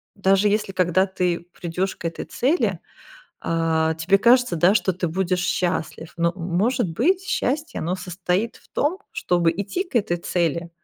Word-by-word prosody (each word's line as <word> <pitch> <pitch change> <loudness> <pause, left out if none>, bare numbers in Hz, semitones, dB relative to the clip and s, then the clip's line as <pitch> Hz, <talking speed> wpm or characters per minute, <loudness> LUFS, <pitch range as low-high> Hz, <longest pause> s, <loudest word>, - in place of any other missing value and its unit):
даже 195 +1 +3
если, 210 -1 0
когда 185 0 +2
ты 180 -3 -2
придешь 180 +3 -3
к - - -10
этой 165 - -6
цели, 290 +8 0 0.6
а, 160 -1 +1
тебе 170 +5 +2
кажется, 240 -3 +4
да, 175 +5 +4
что 195 -3 +2
ты 180 0 -2
будешь 180 +2 0
счастлив. 175 -2 -2
Но, 170 0 +1
может 190 +6 0
быть, 345 - +2
счастье, 305 -5 -2
оно 175 +3 -1
состоит 185 +4 -2
в - - -23
том, 310 +6 0
чтобы 175 - +1
идти 205 - -3
к 350 - -22
этой 210 -7 +1
цели, 170 -1 -1
185 Hz, 160 wpm, -23 LUFS, 170-215 Hz, 0.6 s, кажется